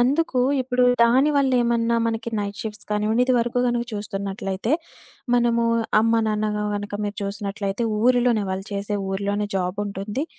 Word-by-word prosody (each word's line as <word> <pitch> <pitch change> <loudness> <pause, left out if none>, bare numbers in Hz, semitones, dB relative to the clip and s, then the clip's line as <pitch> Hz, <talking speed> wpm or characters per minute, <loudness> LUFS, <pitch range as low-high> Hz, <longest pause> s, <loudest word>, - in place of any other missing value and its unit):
అందుకు 270 +2 +2 0.2
ఇప్పుడు 250 0 +1 0.2
దాని 255 +5 +4
వల్ల 275 -2 +2
ఏమన్నా 235 0 +1
మనకి 230 +1 -2
నైట్ 200 -1 -4
షిఫ్ట్స్ 215 -1 -7
కానివ్వండి 215 +3 +1
ఇది 255 - +3
వరకు 240 +1 0
గనుక 240 -1 0
చూస్తున్నట్లయితే 200 +1 -3 0.6
మనము 235 -1 +2 0.4
అమ్మ, 225 +1 +2
నాన్న 215 0 0 0.3
కనుక 205 0 -4
మీరు 205 0 -4
చూసినట్లయితే 200 +1 -3 0.2
ఊరిలోనే, 245 -2 +3
వాళ్ళు 190 +1 -4
చేసే 200 +1 -2
ఊరిలోనే 200 +1 -1
జాబుంటుంది. 200 - -2
215 Hz, 140 wpm, -23 LUFS, 200-240 Hz, 0.6 s, దాని